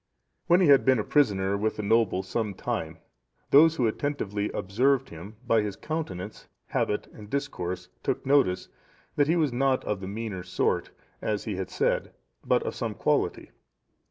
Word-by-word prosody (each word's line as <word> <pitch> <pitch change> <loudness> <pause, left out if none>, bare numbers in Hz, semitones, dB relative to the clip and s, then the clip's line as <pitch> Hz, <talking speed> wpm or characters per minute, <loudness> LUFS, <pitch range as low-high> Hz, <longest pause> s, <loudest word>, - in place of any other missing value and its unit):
When 175 +1 +5
he 180 - +5
had 140 -1 +7
been 130 -1 +4
a 105 - 0
prisoner 100 -9 +2
with 110 +2 -1
the 105 - -4
noble 100 -3 +2
some 100 +1 -2
time, 80 -2 -3 0.5
those 160 +3 +7
who 125 - +1
attentively 110 -4 -2
observed 130 +7 +1
him, 85 +7 -10
by 115 -2 +3
his 105 -2 -3
countenance, 105 - -5 0.2
habit, 105 - 0
and 105 -1 -12
discourse, 90 -11 -3
took - - -2
notice, 135 -10 +2 0.5
that 145 -1 +3
he 165 - +3
was 155 -7 +1
not 130 +1 +1
of 105 - -2
the 95 - -6
meaner 105 -2 -4
sort, 90 - -1 0.3
as 105 -1 -1
he 105 - -3
had 95 - -4
said, - - 0 0.3
but - - +2
of - - -3
some - - -4
quality. - - 0
110 Hz, 170 wpm, -27 LUFS, 95-140 Hz, 0.5 s, had